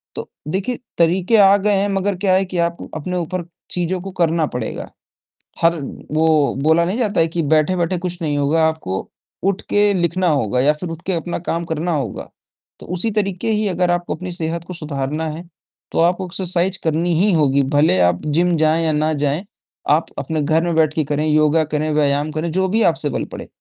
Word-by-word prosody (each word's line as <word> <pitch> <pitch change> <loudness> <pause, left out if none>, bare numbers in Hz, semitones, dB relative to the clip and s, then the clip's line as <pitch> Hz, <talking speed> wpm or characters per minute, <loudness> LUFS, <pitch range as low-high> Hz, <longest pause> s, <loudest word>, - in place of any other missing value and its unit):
तो - - -6 0.2
देखिए, 195 +9 -2 0.2
तरीके 180 +6 +3
आ 200 -1 +7
गए 205 +1 +1
हैं, 200 +1 +1
मगर 195 0 0
क्या 190 -1 +2
है 190 +1 +3
कि 180 -1 -5
आप 170 0 0 0.2
अपने 180 +4 -3
ऊपर 175 0 -3 0.3
चीज़ों 180 +1 -1
को 195 0 -7
करना 165 -1 +2
पड़ेगा, 120 -3 -4 0.7
हर 165 -1 +3 0.3
वो 155 -3 +2
बोला 160 +2 +4
नहीं 190 +6 -2
जाता 210 -7 +1
है 165 - +3
कि 170 +1 -2
बैठे-बैठे 165 +4 +2
कुछ 175 0 -4
नहीं 145 -2 -1
होगा, 150 +3 +2
आपको 95 -13 -4 0.3
उठके 205 +1 +1
लिखना 180 0 0
होगा 125 -6 +1
या 145 +4 +4
फिर 165 +3 -6
उठके 170 +3 -4
अपना 170 +1 -2
काम 170 0 -1
करना 165 +2 -2
होगा। 140 - -4 0.5
तो - - -11
उसी 220 +5 -1
तरीके 200 -1 -1
ही 210 -1 +1
अगर 180 -1 +1
आपको 175 0 -1
अपनी 185 0 -6
सेहत 170 0 -3
को 180 - -6
सुधारना 150 -1 -3
है, 160 +3 -6 0.5
तो - - -1
आपको 180 +2 +2
एक्सरसाइज़ 185 +1 -1
करनी 165 +2 +1
ही 205 +1 +3
होगी, 140 -3 +3
भले 145 -8 +3
आप 90 0 +2
जिम 170 +3 +2
जाएँ 160 +1 +2
या 160 - +2
ना 155 +1 +1
जाएँ, 145 +4 -1 0.5
आप - - +3
अपने 160 -2 -2
घर 160 +3 +2
में 170 -1 -1
बैठके 155 0 +2
करें, 150 +1 -1
योगा 155 +1 +3
करें, 155 +1 0
व्यायाम 145 0 +1
करें, 155 +2 -2
जो 190 +2 +1
भी 225 +3 +1
आपसे 160 -3 +1
बल - - -2
पड़े। - - -7
165 Hz, 200 wpm, -19 LUFS, 155-185 Hz, 0.7 s, आ